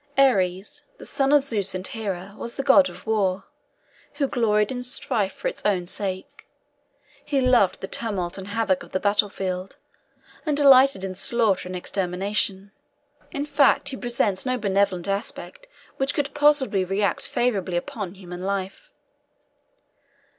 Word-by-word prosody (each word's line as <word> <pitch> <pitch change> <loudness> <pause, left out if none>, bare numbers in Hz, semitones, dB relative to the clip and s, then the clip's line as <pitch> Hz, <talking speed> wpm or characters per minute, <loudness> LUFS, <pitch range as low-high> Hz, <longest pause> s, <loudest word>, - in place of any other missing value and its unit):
Ares, 195 -8 +2
the - - -11
son 275 0 0
of 290 -2 +5
Zeus 210 -9 -1
and 185 0 -4
Hera, 200 -5 -5
was 235 - -7
the 275 - -3
god 275 +1 +6
of - - -13
war, 195 -4 0 0.7
who 290 -1 0
gloried 210 -4 +1
in 250 -1 -4
strife 245 -5 -1
for - - -5
its - - -5
own 190 -4 +1
sake; 190 +1 -4 0.8
he 280 - 0
loved 250 -7 +3
the 190 - -4
tumult 190 -6 -3
and 195 -1 -7
havoc 205 -3 0
of - - -13
the 185 - +1
battlefield, 195 -2 -1 0.7
and 300 -3 -1
delighted 275 -6 +6
in 190 -1 -3
slaughter 200 -2 +1
and 185 - -5
extermination; 195 +2 -1 0.6
in 285 +1 -3
fact 290 -2 +3
he 270 - -5
presents 235 -6 0
no 255 -1 -1
benevolent 200 -4 0
aspect 235 - -5 0.3
which 270 +1 0
could 280 -1 -1
possibly 290 -9 +3
react 195 +2 0
favourably 195 -7 0
upon 190 +1 -5
human 180 -2 -9
life. 195 - -4
205 Hz, 145 wpm, -24 LUFS, 190-255 Hz, 0.8 s, god